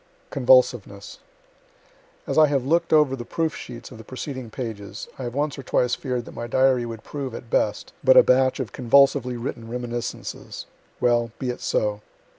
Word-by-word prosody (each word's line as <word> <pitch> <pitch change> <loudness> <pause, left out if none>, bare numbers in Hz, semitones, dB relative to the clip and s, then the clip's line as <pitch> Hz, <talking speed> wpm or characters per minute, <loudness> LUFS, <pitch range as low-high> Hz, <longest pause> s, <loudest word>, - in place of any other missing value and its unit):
"CONVULSIVENESS" - - +2 1.1
As - - -3
I 155 - +7
have 140 -3 0
look'd 170 +4 +1
over 150 -4 +4
the 120 - -6
proof 160 +5 -2
sheets 120 +1 -9
of 120 - -11
the - - -10
preceding 130 0 -6
pages, 110 -4 -6
I 130 - -4
have 120 +1 -5
once 145 0 -1
or - - -4
twice 125 -1 +1
fear'd 125 -4 -2
that - - -11
my 120 - -5
diary 130 -1 +2
would 115 -1 -8
prove, 135 -5 -5
at 120 - -10
best, - - 0
but - - +6
a - - +10
batch 130 +1 +3
of 130 -5 -4
convulsively 130 0 +3
written 115 -1 -6
reminiscences. 120 0 -5 0.3
Well, 120 -1 +2
be 130 -2 -2
it 125 - -9
so. 105 -1 0
125 Hz, 180 wpm, -24 LUFS, 120-140 Hz, 1.1 s, a